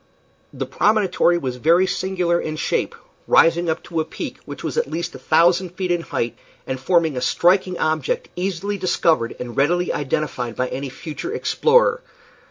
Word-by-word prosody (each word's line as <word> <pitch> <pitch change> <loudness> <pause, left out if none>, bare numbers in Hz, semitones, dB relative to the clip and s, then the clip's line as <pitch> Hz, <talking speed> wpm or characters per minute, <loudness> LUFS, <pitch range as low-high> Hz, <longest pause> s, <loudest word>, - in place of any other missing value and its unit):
The - - -4
promontory 195 -5 +2
was 130 -6 -4
very 170 +8 +4
singular 180 -2 0
in 155 - -4
shape, - - -1 0.3
rising 165 +1 +4
up 160 - -2
to 165 -2 -3
a - - +2
peak - - -7
which - - -8
was - - -3
at 475 0 0
least 170 - -3
a - - -9
thousand 175 +1 +3
feet 185 -2 -2
in 175 -1 +1
height, 120 -7 -3 0.3
and 130 - -4
forming 160 +1 +2
a 125 - -2
striking 185 +3 +2
object, 470 - -1
easily 195 +2 -3
discovered 165 -9 +1
and 120 -1 -6
readily 175 +6 +1
identified 130 -4 -2
by 125 0 -1
any 135 +1 -4
future 160 - -6
explorer. 480 +2 +2
170 Hz, 170 wpm, -21 LUFS, 155-190 Hz, 0.3 s, very